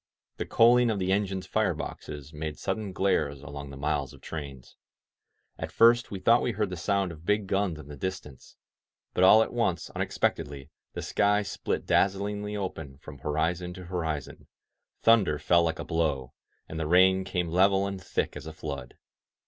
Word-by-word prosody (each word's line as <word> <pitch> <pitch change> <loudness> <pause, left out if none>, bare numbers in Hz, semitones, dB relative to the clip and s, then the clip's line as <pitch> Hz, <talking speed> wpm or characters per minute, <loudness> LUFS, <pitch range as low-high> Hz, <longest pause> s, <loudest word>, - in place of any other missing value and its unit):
The - - -4
coaling 120 +1 +5
of 110 - 0
the 95 -1 0
engines' 95 -2 0
fire - - +1
boxes 75 +1 -7
made 75 0 -5
sudden 100 +1 -3
glares 75 -7 0
along 70 0 -7
the 70 - -9
miles 70 -1 -1
of - - -15
trains. 70 -5 -8 0.8
At - - -4
first 120 +1 +5
we 100 - -5
thought 115 +6 +4
we 120 - -1
heard 105 -2 -1
the - - -3
sound 100 +1 0
of 80 -1 -12
big 105 +3 +1
guns 95 -3 0
in 75 -2 -11
the 75 - -8
distance. 75 -4 -6 0.6
But 90 - +2
all 110 +4 +8
at - - -7
once, 110 -8 -1
unexpectedly, 70 0 -2 0.2
the - - -5
sky 105 +1 +2
split 100 - -3
dazzlingly 105 +1 0
open 80 -8 -5
from 75 -1 -12
horizon 85 +5 -1
to 90 -1 -9
horizon, 80 -5 -4 0.6
thunder 105 -10 +5
fell 85 +3 +3
like 80 -1 0
a - - -6
blow, 75 -6 -1 0.3
and 80 - -6
the 80 - -2
rain 95 +2 +5
came 90 -2 -2
level 95 +3 +3
and 100 -1 -5
thick 85 - -2
as - - -8
a 80 - -7
flood. 70 -5 -6
90 Hz, 180 wpm, -28 LUFS, 75-100 Hz, 0.8 s, all